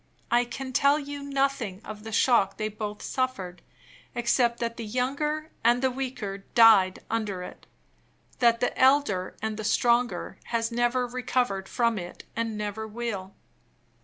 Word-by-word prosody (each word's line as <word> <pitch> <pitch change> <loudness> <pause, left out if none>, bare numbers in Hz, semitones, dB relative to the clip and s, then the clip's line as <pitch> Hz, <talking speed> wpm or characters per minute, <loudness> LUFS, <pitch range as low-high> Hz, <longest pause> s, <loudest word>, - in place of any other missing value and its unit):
I 240 +1 +4
can 260 +2 -6
tell 280 +3 +4
you 285 -1 -6
nothing 275 -8 -1
of 210 -1 -8
the 220 - -7
shock 215 -4 +3
they 215 -1 -1
both 210 0 -6
suffered, 195 -9 -3 0.5
except 235 0 +2
that 230 -1 -2
the 235 - -5
younger 285 +7 -2
and 240 +2 +3
the 260 - +3
weaker 245 -7 -4 0.2
died 215 -5 +6
under 210 -5 -2
it; - - -11 0.7
that 235 -1 +4
the 245 - 0
elder 260 -9 +3
and 220 -1 -2
the 220 - -4
stronger 240 +3 +1
has 230 0 -1
never 240 +1 +1
recovered 245 -5 -1
from 230 -3 +1
it, 175 0 -8
and 230 -2 -2
never 210 +1 -4
will. 210 -4 -5
235 Hz, 150 wpm, -27 LUFS, 210-255 Hz, 0.7 s, died